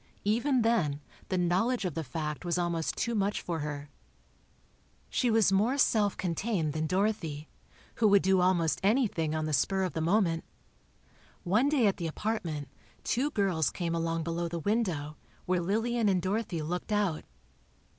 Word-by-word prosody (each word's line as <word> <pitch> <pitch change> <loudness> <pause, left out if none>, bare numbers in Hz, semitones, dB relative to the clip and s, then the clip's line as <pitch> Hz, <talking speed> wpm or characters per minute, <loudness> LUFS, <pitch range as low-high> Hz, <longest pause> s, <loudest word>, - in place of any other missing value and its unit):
Even 240 +4 +2
then, 175 -12 +1 0.3
the 185 - 0
knowledge 190 +7 +1
of 180 - -2
the 160 - -3
fact 150 +3 -4
was 175 0 -1
almost 170 -2 -1
too 235 - -1
much 205 -1 0
for 170 -2 -3
her. 145 -1 -5 1.2
She 250 - +1
was 220 -3 +4
more 215 +8 +2
self 210 -6 +2
contained 175 -3 -1
than 155 0 -1
Dorothy, 170 -5 -1 0.5
who 220 - +4
would 200 -1 +5
do 190 0 +3
almost 175 -3 +2
anything 195 - +1
on 155 0 -1
the 155 - -2
spur 190 +8 +1
of 185 - -2
the 160 - -2
moment. 165 -1 +2 1.0
One 215 +10 +2
day 280 -6 +3
at 200 -1 +2
the 170 -3 -3
apartment, 165 -5 -3 0.4
two 270 +5 0
girls 190 - +1
came 170 -2 -3
along 165 0 -1
below 170 +1 -2
the 170 0 -4
window, 165 -6 -1 0.3
where 180 -1 +1
Lillian 225 +4 +1
and 185 -2 +2
Dorothy 190 -3 -2
looked 180 +7 -4
out. 205 -7 0
185 Hz, 165 wpm, -30 LUFS, 165-215 Hz, 1.2 s, would